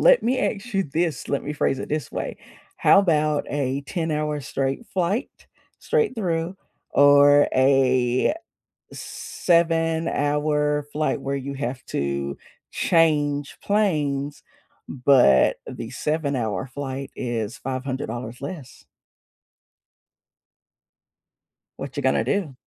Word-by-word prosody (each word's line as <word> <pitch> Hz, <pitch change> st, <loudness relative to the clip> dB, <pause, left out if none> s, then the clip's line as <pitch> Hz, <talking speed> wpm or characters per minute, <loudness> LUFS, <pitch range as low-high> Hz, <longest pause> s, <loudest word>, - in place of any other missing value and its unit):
let -, -, +6 dB
me 255 Hz, +2 st, +1 dB
ask 220 Hz, +3 st, -2 dB
you 195 Hz, -, +2 dB
this, 160 Hz, +2 st, -2 dB
let 140 Hz, -, -1 dB
me 150 Hz, -, -4 dB
phrase 135 Hz, -2 st, 0 dB
it -, -, -6 dB
this 155 Hz, -1 st, -3 dB
way: -, -, -4 dB, 0.4 s
how 200 Hz, -, +5 dB
'bout 155 Hz, -4 st, +1 dB
a 140 Hz, -1 st, -1 dB
ten-hour-straight 150 Hz, -, -2 dB
flight, 190 Hz, +7 st, -2 dB, 0.3 s
straight 455 Hz, -, 0 dB
through, 175 Hz, -4 st, -2 dB, 0.3 s
or 145 Hz, 0 st, +6 dB
a 130 Hz, -, +3 dB, 0.6 s
seven-hour 155 Hz, -3 st, 0 dB
flight 150 Hz, -1 st, -1 dB
where 140 Hz, +1 st, -2 dB
you 140 Hz, +1 st, -5 dB
have 125 Hz, -1 st, -4 dB
to 70 Hz, 0 st, -2 dB, 0.3 s
change 145 Hz, -4 st, +1 dB
planes, 150 Hz, -9 st, 0 dB, 0.5 s
but 125 Hz, -, +4 dB
the -, -, -7 dB
seven-hour 135 Hz, -, -2 dB
flight 135 Hz, 0 st, -5 dB
is 115 Hz, -4 st, -3 dB
$500 130 Hz, -2 st, -4 dB
less. 140 Hz, -2 st, -8 dB, 2.9 s
What 135 Hz, 0 st, -7 dB
you 145 Hz, -, -2 dB
gonna 130 Hz, -, +2 dB
do? 180 Hz, -10 st, -1 dB
145 Hz, 105 wpm, -23 LUFS, 135-165 Hz, 2.9 s, let